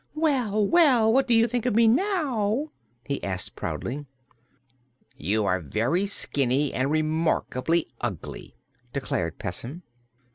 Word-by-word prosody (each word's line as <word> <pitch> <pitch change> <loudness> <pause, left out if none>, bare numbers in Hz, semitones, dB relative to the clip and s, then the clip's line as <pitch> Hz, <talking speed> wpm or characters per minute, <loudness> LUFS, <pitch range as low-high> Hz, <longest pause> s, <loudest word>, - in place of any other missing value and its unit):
"Well, 250 -10 +1
well! 250 - +5
What 265 +1 +3
do 240 - +4
you 225 +1 +5
think 245 +1 -1
of 235 - +1
me 230 0 +5
now?" 275 - +1 0.3
he 140 -1 -3
asked 95 -2 -3
proudly. 140 +3 -4 1.1
"You 105 +7 0
are 95 -1 +1
very 120 - 0
skinny 140 -6 0
and 130 +2 0
remarkably 155 0 +1 0.2
ugly," 105 -10 -5 0.4
declared 90 - -2
Pessim. 130 - -5
170 Hz, 120 wpm, -26 LUFS, -, 1.1 s, well